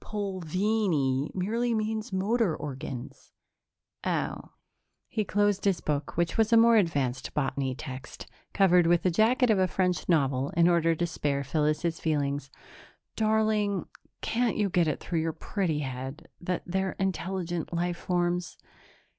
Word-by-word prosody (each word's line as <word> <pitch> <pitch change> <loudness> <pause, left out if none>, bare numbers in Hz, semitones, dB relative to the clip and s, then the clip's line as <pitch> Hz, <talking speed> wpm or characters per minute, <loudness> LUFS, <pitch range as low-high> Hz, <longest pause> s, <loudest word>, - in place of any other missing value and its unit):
"Pulvini 185 -7 0
merely 230 +6 0
means 220 +1 -2
motor 195 -1 +1
organs." 135 -2 -7 0.7
"Oh." - - -2 0.5
He 215 - -1
closed 205 0 +1
his 195 -3 +2
book, 145 0 -3
which 170 +5 0
was 220 0 +3
a 230 - +7
more 230 0 +6
advanced 140 - +1
botany 135 -2 -1
text, 130 0 -8 0.3
covered 180 -3 +4
with 175 0 +3
the 185 - +3
jacket 230 +6 +3
of 205 - +3
a 185 - +3
French 180 -2 -1
novel 140 -4 +2
in 170 0 +6
order 165 -1 +3
to 175 - 0
spare 145 -4 -1
Phyllis's 155 +3 0
feelings. 145 -3 -1 0.7
"Darling, 215 -3 +1 0.4
can't 240 0 0
you 205 -3 +1
get 175 -2 +3
it 155 - -1
through 170 - -2
your 160 0 -1
pretty 170 -6 -2
head 130 +1 -6
that 180 0 -2
they're 190 +1 -1
intelligent 185 -3 -2
life 175 0 -1
forms? 175 0 -1
175 Hz, 140 wpm, -28 LUFS, 150-205 Hz, 0.7 s, a